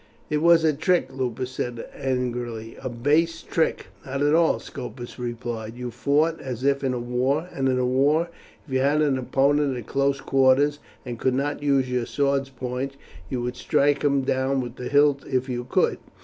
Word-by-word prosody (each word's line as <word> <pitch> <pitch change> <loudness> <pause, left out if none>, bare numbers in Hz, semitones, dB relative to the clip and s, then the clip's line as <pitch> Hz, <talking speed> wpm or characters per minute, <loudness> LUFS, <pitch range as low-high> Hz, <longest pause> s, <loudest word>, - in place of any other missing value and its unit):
"It 150 - +2
was 165 +1 +5
a 155 -1 +4
trick," 170 +5 +1
Lupus 130 -1 -3
said 120 -2 -4
angrily, 120 -3 -3
"a 130 - -3
base 150 +7 +1
trick." 160 - 0 0.2
"Not 135 +1 -2
at 145 +1 +3
all," 165 0 +4
Scopus 125 0 -8
replied. 120 -2 -5
"You 125 0 -5
fought 145 +8 +1
as 125 -2 -5
if 140 0 +2
in 125 -2 -2
war; 135 +7 +1
and 135 -1 0
in 125 -1 +1
war 150 +6 +3 0.4
if 140 - -9
you 130 - +3
had 145 +3 +3
an 135 -3 +1
opponent 140 +1 +2
at 120 - -7
close 140 0 0
quarters, 135 +3 +3 0.3
and 120 -2 -6
could 130 -1 +1
not 145 +2 -1
use 140 -3 +2
your 125 -2 -1
sword's 140 -1 0
point, 130 +1 -4 0.3
you 125 -1 -2
would 125 +1 -3
strike 140 +3 +1
him 140 -2 +2
down 130 +1 +1
with 120 -1 -5
the 125 - -5
hilt 145 -1 +4
if 130 -1 0
you 120 -1 -3
could. 125 - +1
135 Hz, 185 wpm, -24 LUFS, 125-145 Hz, 0.4 s, was